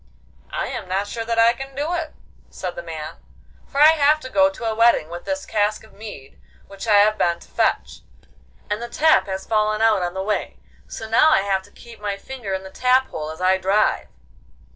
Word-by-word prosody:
'I - - -2
am - - -6
not 195 +2 0
sure 225 +2 -5
that 230 0 -2
I 230 +1 +5
can 270 +2 -9
do 295 +5 -2
it,' 330 -3 -4 0.3
said 180 -2 -6
the - - -5
man, 160 -1 -7 0.5
'for 280 - -4
I 300 +1 +9
have 305 -1 +4
to 260 - -9
go 290 +1 +4
to 290 -5 -8
a 225 - 0
wedding 230 -8 +3
with 175 +1 -8
this 285 0 -3
cask 210 0 0
of 220 - -18
mead 205 -11 -11 0.2
which 195 +3 -9
I 210 - +5
have 210 +1 +4
been 170 -1 +2
to - - -16
fetch, - - -1 0.7
and 210 +2 -3
the 240 - -5
tap 315 0 +3
has 190 0 -4
fallen 215 -1 +1
out 220 -3 +3
on 175 0 -3
the 190 - -2
way, 210 +1 -2 0.3
so 220 - -7
now 230 +8 +5
I 310 - +4
have 195 -1 0
to - - -20
keep 235 -1 -14
my 205 -1 -3
finger 240 -1 -7
in 190 - -5
the 190 - -10
tap 255 +3 +2
hole 155 -1 -5
as 160 +3 -8
I 190 +1 +3
drive. 195 +3 +1
215 Hz, 225 wpm, -22 LUFS, 190-255 Hz, 0.7 s, I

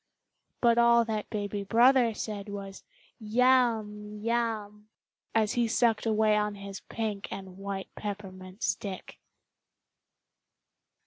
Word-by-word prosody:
But 235 -1 +4
all 235 0 +5
that 215 -2 -3
baby 205 -1 -3
brother 235 +2 +4
said 210 -2 -5
was 195 -1 -7 0.4
"Yum! 220 -3 +2
Yum!" 215 -2 -2 0.5
as 220 -2 +2
he 240 -1 +2
sucked 230 -1 +2
away 215 -1 +3
on 210 -1 0
his 200 -1 -8
pink 215 -3 -4
and 190 -2 -7
white 195 -1 -5
peppermint 190 -2 -7
stick! 195 -3 -3
210 Hz, 110 wpm, -29 LUFS, 200-230 Hz, 0.5 s, all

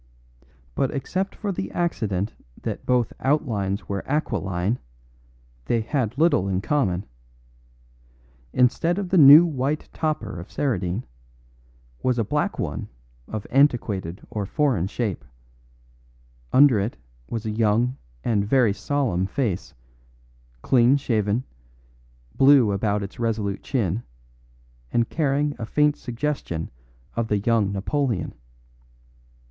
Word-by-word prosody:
But 135 - 0
except 185 +7 -3
for 205 -2 -3
the 95 - -4
accident 110 - -1 0.3
that - - -5
both 125 -2 +2
outlines 110 -9 0
were 100 -1 -2
aquiline, 100 - -1 0.9
they 115 - +1
had 120 +1 -2
little 150 - +3
in 95 -1 0
common. 100 - 0 1.5
Instead 130 +8 +2
of 200 -3 -3
the 185 - +4
new 150 +4 +10
white 145 -1 -2
topper 115 - -2
of 85 - -9
Saradine, 105 -6 -1 1.0
was 125 -1 +1
a 115 - +2
black - - -1
one - - -3 0.4
of 110 -2 -5
antiquated 110 - +1
or 105 -3 -3
foreign 125 - +1
shape; 100 - -3 1.3
under 130 -5 +6
it 100 +4 -2 0.3
was 115 -1 -4
a 110 - -1
young 115 +3 +2 0.3
and 105 -4 +1
very 115 0 +3
solemn 100 -4 -1
face, 100 -4 -2 0.9
clean 125 +2 +4
shaven, 110 -3 0 0.9
blue 135 -5 +6
about 100 +1 0
its 100 - -8
resolute 110 -4 -1
chin, 110 -5 -1 0.9
and 115 -1 +1
carrying 145 -1 0
a 115 - -3
faint 150 +4 +3
suggestion 120 - -4 0.4
of 115 -1 -1
the 105 - +1
young 105 -1 +1
Napoleon. 110 - -1
115 Hz, 115 wpm, -24 LUFS, 100-140 Hz, 1.5 s, new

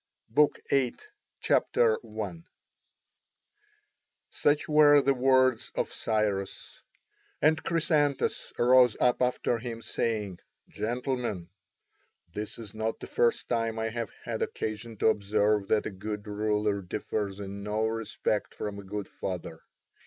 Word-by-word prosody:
BOOK 145 +6 +3
VIII 130 -3 +2 0.5
[C.1] 455 - +1 1.9
Such 145 0 +1
were 150 -1 +7
the 140 0 +3
words 130 -1 +3
of - - -2
Cyrus; 105 -3 -2 0.6
and 155 -1 +3
Chrysantas 150 -3 0
rose 125 -1 +5
up 125 0 +3
after 125 -1 +1
him, 115 -1 -6
saying, 105 -6 -2 0.3
"Gentlemen, 120 -6 -3 0.8
this 105 +1 -5
is 110 -3 -9
not 110 +1 -2
the - - -7
first 120 -1 +1
time 115 -2 0
I 110 0 -1
have 115 -2 -4
had - - -4
occasion 110 +1 -4
to 110 - +4
observe 105 -1 +1
that 110 - +2
a - - -3
good 105 +2 -5
ruler 105 -1 0
differs 100 +1 -3
in 100 0 -6
no 105 +2 -1
respect 110 -1 -2
from 105 -1 -5
a - - -9
good 100 +1 -5
father. 85 -3 -6
110 Hz, 125 wpm, -29 LUFS, 105-125 Hz, 1.9 s, were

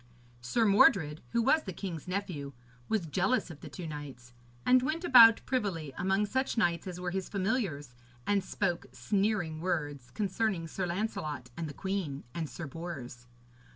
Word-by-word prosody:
Sir 225 - +1
Mordred, 180 -6 +4
who 235 -1 +1
was 310 +6 +4
the 190 - -6
king's 175 -4 -6
nephew, 180 -8 -3 0.4
was 215 -6 +1
jealous 190 - 0
of 155 - -11
the - - -9
two 180 - -7
knights, 140 -6 -8 0.3
and 255 0 +6
went 310 +6 -2
about 235 -8 +8
privily 185 - -2
among 190 +3 +1
such 260 +4 -1
knights 175 -3 +1
as 180 -1 -5
were 180 -1 -3
his 190 0 -3
familiars, 190 - -1 0.3
and 205 -2 +2
spoke 180 -2 -2
sneering 195 -6 0
words 145 -8 -2
concerning 190 - -1
Sir 180 +2 -3
Lancelot 155 - -3
and 165 -2 -4
the - - -7
queen 190 -8 -3
and 160 -3 -3
Sir 170 - -6
Bors. 135 -6 -7
180 Hz, 160 wpm, -31 LUFS, 155-205 Hz, 0.4 s, about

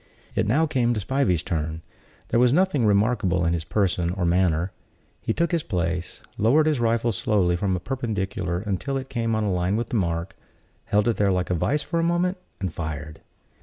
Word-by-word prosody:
It - - 0
now 145 +9 +3
came 120 -5 +1
to - - -1
Spivey's 105 - +1
turn. 80 -1 -3 0.5
There 115 - +2
was 125 0 +5
nothing 150 - +3
remarkable 100 -4 +2
in 85 - +2
his 85 -2 -2
person 90 -2 0
or 90 0 -1
manner. 85 0 +2 0.5
He - - -1
took 170 +8 0
his 170 -2 +1
place, 85 - -3 0.2
lowered 135 +9 +4
his 155 -4 +1
rifle 115 0 +1
slowly 95 -3 +1
from 95 +1 0
a - - -2
perpendicular 95 -6 -2
until 105 +7 -2
it 135 0 -6
came 115 -3 -1
on 110 - 0
a 100 -3 0
line 90 +2 0
with 115 +2 -2
the 120 - 0
mark, 85 0 -2 0.5
held 105 +1 +2
it 115 - +1
there 100 -1 +3
like 90 -1 0
a - - +3
vice 145 - 0
for 170 - -1
a - - +1
moment 175 +2 +1 0.2
and 95 -4 -3
fired. 80 -1 -5
100 Hz, 205 wpm, -24 LUFS, 90-120 Hz, 0.5 s, was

